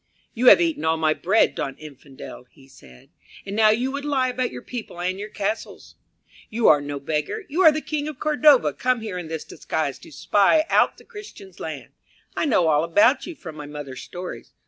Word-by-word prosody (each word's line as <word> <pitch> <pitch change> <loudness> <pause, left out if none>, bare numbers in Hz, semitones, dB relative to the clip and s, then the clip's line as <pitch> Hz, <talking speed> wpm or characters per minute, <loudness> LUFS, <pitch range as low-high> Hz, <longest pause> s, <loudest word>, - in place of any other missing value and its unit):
"You 245 +2 0
have 195 - +9
eaten 165 -3 0
all 160 0 +1
my 155 -1 +2
bread, 190 +7 +2
don 135 -1 -4
Infidel," 140 -4 -12
he 135 -1 -21
said, 65 - -18 0.3
"and 200 0 -5
now 215 0 +5
you 245 +5 +1
would 280 +1 -5
lie 270 -3 0
about 250 0 -2
your - - -9
people 230 -8 -8
and 185 +2 -2
your 210 +1 -6
castles. 210 +1 -5 0.6
You 225 +1 +1
are 145 -2 +5
no 145 0 -5
beggar; 155 - -3
you 325 +6 0
are 320 -4 +8
the 310 +1 -3
King 300 -1 -3
of 305 -3 -6
Cordova 300 -2 +4
come 255 -2 0
here 205 -5 -5
in 175 - -7
this 160 -1 -5
disguise 155 -4 -4
to - - -15
spy 205 - +2
out - - +3
the - - -18
Christian's 415 -3 -12
land. - - -7 0.4
I - - 0
know 205 - +2
all 150 -1 +3
about 205 - +3
you 345 - -7
from 160 - -10
my 150 -1 -8
mother's 145 -3 -8
stories. 180 +1 -9
200 Hz, 210 wpm, -23 LUFS, -, 0.6 s, have